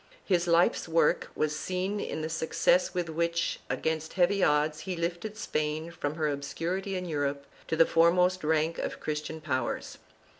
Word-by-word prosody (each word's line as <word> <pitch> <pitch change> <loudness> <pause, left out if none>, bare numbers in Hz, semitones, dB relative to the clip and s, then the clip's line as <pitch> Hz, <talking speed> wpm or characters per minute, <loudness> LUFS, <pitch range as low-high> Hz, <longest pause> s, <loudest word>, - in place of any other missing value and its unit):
His 175 -3 +2
life's 170 +1 +3
work 165 -2 +2
was 155 0 0
seen 185 +6 -2
in 155 - -3
the - - -1
success 165 +2 +2
with 175 -1 0
which, 170 +1 -1
against 160 0 -2
heavy 190 +1 +3
odds, 150 0 +2
he 185 +2 -4
lifted 175 +5 -3
Spain 155 -4 -2
from 155 -3 -3
her 155 -1 0
obscurity 170 +7 -3
in 180 0 -3
Europe 145 -3 -2 0.2
to - - 0
the 165 +1 +6
foremost 180 +3 +3
rank 160 +1 +1
of - - -3
Christian 155 +1 -4
powers. 130 -5 -3
165 Hz, 160 wpm, -29 LUFS, 155-180 Hz, 0.2 s, the